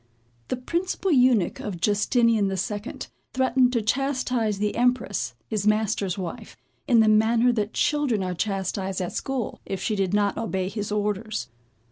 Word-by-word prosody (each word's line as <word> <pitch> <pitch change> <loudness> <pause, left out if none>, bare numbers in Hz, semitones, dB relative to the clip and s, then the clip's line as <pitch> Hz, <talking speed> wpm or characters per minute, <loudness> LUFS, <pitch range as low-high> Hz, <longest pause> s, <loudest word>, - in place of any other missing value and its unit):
The 255 - -2
principal 350 +8 -1
eunuch 250 - +3
of 195 -5 -5
Justinian 210 +2 +2
the 190 0 -2
Second, 205 +5 -4 0.2
threatened 260 -1 +3
to 235 -3 +1
chastise 250 -3 0
the 210 +1 -1
Empress, 240 - 0
his 210 -1 -1
master's 210 -3 +1
wife, 180 -3 -6 0.3
in 235 -3 +5
the 220 - +4
manner 225 +3 +4
that 215 -2 -2
children 290 -9 +1
are 180 -1 -2
chastised 190 0 -2
at 180 -2 -3
school, 270 -4 -3
if 195 - -4
she 215 - -1
did 195 -3 0
not 205 -1 +1
obey 190 -5 -2
his 210 0 -4
orders. 210 +1 -2
215 Hz, 155 wpm, -25 LUFS, 195-245 Hz, 0.3 s, in